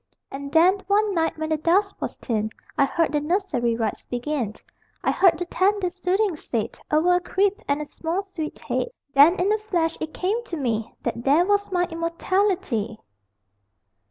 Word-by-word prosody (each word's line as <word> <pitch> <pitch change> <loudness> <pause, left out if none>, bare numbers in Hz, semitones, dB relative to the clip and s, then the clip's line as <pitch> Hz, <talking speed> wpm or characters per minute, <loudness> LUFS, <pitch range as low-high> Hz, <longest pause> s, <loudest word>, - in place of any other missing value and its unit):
And 280 +1 -6
then 350 +5 +5
one 410 +1 +2
night 325 -2 0
When 315 0 -3
the 315 - +1
dusk 375 +6 +1
was - - -4
thin 220 -3 -2 0.3
I 275 - +4
heard 330 +4 0
the 300 - +1
nursery 300 - 0
Rites 225 -2 -2
begin: 245 -3 -3 0.5
I - - +2
heard 355 -4 +4
the 355 - -3
tender 375 +1 +1
Soothings 370 -1 0
said 225 -3 -3
Over 320 +4 +3
a - - 0
crib, 395 +4 0
and 290 +1 0
A - - -8
small 335 +6 -3
sweet 315 -4 -5
head. - - -1 0.3
Then 290 +6 +7
in 390 +4 +3
a 430 - 0
flash 350 -6 -1
It 315 - -4
came 415 +8 -1
to 340 - -5
me 230 -5 -1
That 235 - -3
there 295 +7 +4
was 405 0 +1
my 355 -1 +2
Immortality! 335 - -1
335 Hz, 180 wpm, -24 LUFS, 285-380 Hz, 0.5 s, Then